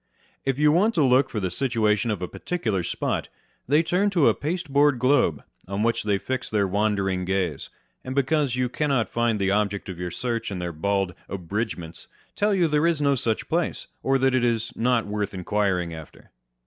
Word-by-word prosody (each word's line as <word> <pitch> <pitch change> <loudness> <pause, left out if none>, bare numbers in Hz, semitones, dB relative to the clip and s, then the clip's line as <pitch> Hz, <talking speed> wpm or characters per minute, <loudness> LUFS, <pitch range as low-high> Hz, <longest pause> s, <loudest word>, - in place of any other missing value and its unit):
If 135 -1 0
you 150 0 +4
want 205 +8 +3
to 160 - +3
look 130 +1 +4
for 110 - -3
the 95 -3 -2
situation 115 -1 +1
of 100 -4 -2
a - - -2
particular 110 - -2
spot, 85 - -2 0.4
they 150 +5 +4
turn 185 +5 +1
to 175 -7 +4
a - - +3
pasteboard 145 -4 +1
globe, 125 - +2 0.2
on 100 +2 -2
which 115 0 +1
they 105 -2 +1
fix 130 +5 -4
their 105 -2 +1
wandering 100 -2 0
gaze; 90 -5 -2 0.3
and 130 +1 -5
because 140 -1 +1
you 125 0 +1
cannot 130 -5 0
find 120 -2 +1
the 95 -1 +1
object 100 -1 0
of 90 -2 -7
your 90 0 -3
search 115 +4 -3
in 100 - -4
their 90 -1 -4
bald 95 +3 0
" - - -33
abridgements," 90 -3 -4 0.3
tell 205 0 +2
you 175 -3 +3
there 150 +1 +2
is 170 -3 +1
no 140 -1 +3
such 115 -4 -1
place, 170 +1 -1 0.2
or 135 0 +2
that 135 0 +2
it 130 -1 +2
is 115 0 0
not 120 -1 +1
worth 105 -1 -3
inquiring 90 -2 0
after. 80 -1 -12
115 Hz, 200 wpm, -25 LUFS, 100-140 Hz, 0.4 s, you